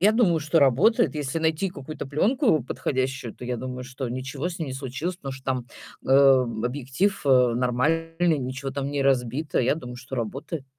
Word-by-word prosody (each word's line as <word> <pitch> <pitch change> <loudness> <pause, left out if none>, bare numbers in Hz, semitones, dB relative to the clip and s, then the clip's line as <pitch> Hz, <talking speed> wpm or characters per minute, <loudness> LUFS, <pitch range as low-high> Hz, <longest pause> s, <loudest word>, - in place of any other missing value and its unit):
я 205 +4 +5
думаю, 195 -8 +3
что 155 +2 +2
работает. 170 - +4
Если 145 0 -2
найти 160 +4 0
какую-то 145 -3 -7
пленку 180 - +2
подходящую, 130 -3 -2
то - - -10
я 125 0 -2
думаю, 125 +1 -5
что 130 0 -5
ничего 135 +6 -4
с 180 0 -7
ней 160 - -3
не - - -4
случилось, 135 +7 -4
потому 135 -6 -6
что 135 0 -11
там, 130 -2 -2 0.4
э, - - -2 0.6
объектив, 135 +10 -1
э, 125 -3 +5
нормальный, 160 +7 +1
ничего 135 +1 -4
там 140 +1 -3
не 145 -1 -1
разбито. 135 +2 +1
Я 125 +2 +2
думаю, 125 -6 -8
что 125 +1 -8
работает. 135 +6 -4
135 Hz, 185 wpm, -25 LUFS, 130-165 Hz, 0.6 s, я